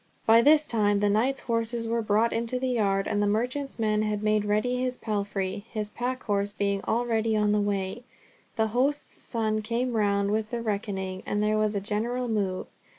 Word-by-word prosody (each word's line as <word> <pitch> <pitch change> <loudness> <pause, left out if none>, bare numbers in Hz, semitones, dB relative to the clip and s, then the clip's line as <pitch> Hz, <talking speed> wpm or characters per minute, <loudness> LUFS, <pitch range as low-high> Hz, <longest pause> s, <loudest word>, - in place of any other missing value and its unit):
By 225 +1 +7
this 300 +4 +5
time 205 -5 +2
the 205 0 +2
knight's 250 +6 +1
horses 230 0 -1
were 230 0 0
brought 215 +2 +2
into 230 +2 -1
the 260 0 -1
yard, 200 -5 +1
and 205 - 0
the 205 - +2
merchant's 250 +7 -1
men 215 -2 +1
had 210 -1 -1
made 215 -1 +2
ready 215 +4 +1
his 255 0 -1
palfrey, 200 -2 -3
his 210 -2 -3
pack 255 +3 -3
horse 205 -1 -1
being 200 -1 0
already 225 -1 +1
on 210 -1 +2
the 210 0 +2
way; 200 +1 -2 0.5
the 220 -2 +1
host's 270 +6 -1
son 220 -2 -1
came 235 +3 -1
round 200 -2 +1
with 215 0 -1
the 235 -1 -3
reckoning, 195 -3 -3
and 205 0 0
there 215 0 +2
was 215 0 +1
a - - +1
general 230 +5 -1
move. 200 -5 -1
215 Hz, 195 wpm, -27 LUFS, 205-235 Hz, 0.5 s, By